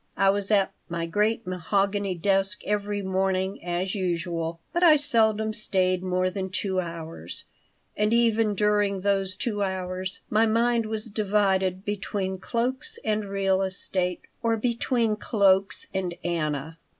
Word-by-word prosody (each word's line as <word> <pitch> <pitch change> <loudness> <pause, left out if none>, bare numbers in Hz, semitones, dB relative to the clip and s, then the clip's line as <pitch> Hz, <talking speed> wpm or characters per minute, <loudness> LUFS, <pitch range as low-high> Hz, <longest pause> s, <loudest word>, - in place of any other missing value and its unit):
I 195 0 +5
was 200 0 -2
at 200 -3 +3 0.2
my 170 -1 -2
great 210 +6 0
mahogany 195 +2 0
desk 195 +3 +1
every 205 0 -1
morning, 190 0 -1
as 175 +2 -2
usual, 170 -3 -2
but 345 - 0
I 335 -4 +8
seldom 220 -6 +2
stayed 185 -4 +1
more 185 0 0
than 190 0 -3
two 190 0 -1
hours, 165 -1 -3 0.5
and 210 +1 +1
even 225 -2 +3
during 205 -1 +2
those 195 -1 +1
two 205 +1 -2
hours 185 -1 -2
my 220 +1 +3
mind 230 0 +2
was 220 0 -3
divided 195 -3 +1
between 195 -2 -3
cloaks 260 - -1
and 215 -1 0
real 195 -1 +1
estate 185 -1 -1 0.2
or 230 -1 +1
between 235 -1 0
cloaks 195 -3 +2
and 185 -3 -2
Anna. 160 -2 -2
195 Hz, 140 wpm, -26 LUFS, 185-215 Hz, 0.5 s, I